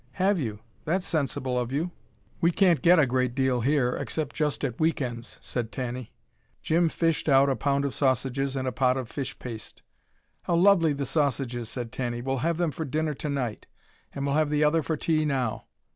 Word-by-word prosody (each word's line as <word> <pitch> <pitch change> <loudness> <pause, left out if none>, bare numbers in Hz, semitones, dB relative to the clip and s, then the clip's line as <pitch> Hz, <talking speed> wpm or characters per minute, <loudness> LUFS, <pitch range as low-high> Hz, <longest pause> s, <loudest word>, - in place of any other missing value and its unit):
"Have 190 +3 +2
you! 110 -6 -4 0.2
That's 180 +4 0
sensible 135 -5 -1
of 120 0 -3
you. 160 +6 -1 0.5
We 170 - +5
can't 175 -5 +3
get 175 +5 +6
a 150 - +5
great 125 -1 0
deal 130 -2 +1
here, 130 -1 +2
except 155 -4 -3
just 150 -2 -1
at 125 -4 -4
week 160 0 +2
ends," 120 -3 -5
said 120 -3 -4
Tanny. 125 -2 -5 0.5
Jim 165 +1 +3
fished 165 -1 0
out 135 0 +5
a - - +1
pound 140 +4 0
of 140 - -2
sausages 135 0 0
and 130 -1 -2
a - - 0
pot 130 0 +2
of 125 -3 -5
fish 135 -3 -4
paste. 115 -4 -9 0.6
"How 170 - 0
lovely 170 -3 +5
the 140 0 -3
sausages," 130 -6 -1
said 120 -2 -5
Tanny. 120 -2 -3
"We'll 135 +2 -1
have 165 +6 0
them 170 -3 +1
for 160 - -4
dinner 155 +2 -1
tonight 135 -6 -3 0.4
and 140 0 -4
we'll 140 - 0
have 155 0 +2
the 150 0 +2
other 155 +2 +3
for 155 +1 -2
tea 155 0 +1
now. 130 -7 -1
140 Hz, 200 wpm, -27 LUFS, 125-155 Hz, 0.6 s, get